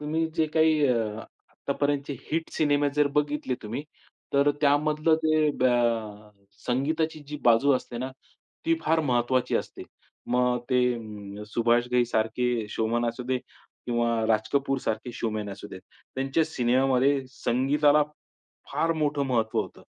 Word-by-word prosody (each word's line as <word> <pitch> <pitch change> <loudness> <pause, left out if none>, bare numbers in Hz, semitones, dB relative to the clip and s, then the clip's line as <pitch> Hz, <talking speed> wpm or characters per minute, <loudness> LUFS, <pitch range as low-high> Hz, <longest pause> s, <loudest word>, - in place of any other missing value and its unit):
तुम्ही 155 +2 -1
जे 160 -1 +3
काही 160 -1 +4
अ, 125 - +3 0.5
आत्तापर्यंतचे 145 0 -2 0.2
हिट 160 +1 -1
सिनेमे 145 -1 +2
जर 150 -1 +4
बघितले 150 -3 0
तुम्ही, 115 +6 -4 0.5
तर 140 +1 +4
त्यामधलं 150 +2 +3
ते 155 -1 +3
बॅ 130 0 +4 1.0
संगीताची 155 +5 0
जी 150 - -5
बाजू 120 +4 +5
असते 120 -1 -7
ना 130 +2 -3 0.6
ती 165 - +4
फार 160 0 +2
महत्त्वाची 125 -2 +1
असते. - - -5 0.5
मग 125 0 +2
ते 125 - +3 0.2
अं, 105 -3 -8
सुभाष 120 +2 +2
घईसारखे 120 -1 +1
शोमॅन 115 +2 0
असू 120 +2 -5
दे 130 +1 0
किंवा 120 -1 -4 0.2
राज 110 -1 +1
कपूरसारखे 135 -4 -1
शोमॅन 110 -3 -3
असू 100 +1 -9
देत. 95 - -9 0.3
त्यांच्या 135 +4 +1
सिनेमामध्ये 135 0 +2
संगीताला, 145 +4 +2 0.7
फार 165 - +1
मोठं 150 -2 0
महत्त्व 115 -4 +1
होतं. - - -11
130 Hz, 130 wpm, -26 LUFS, 120-150 Hz, 1.0 s, बाजू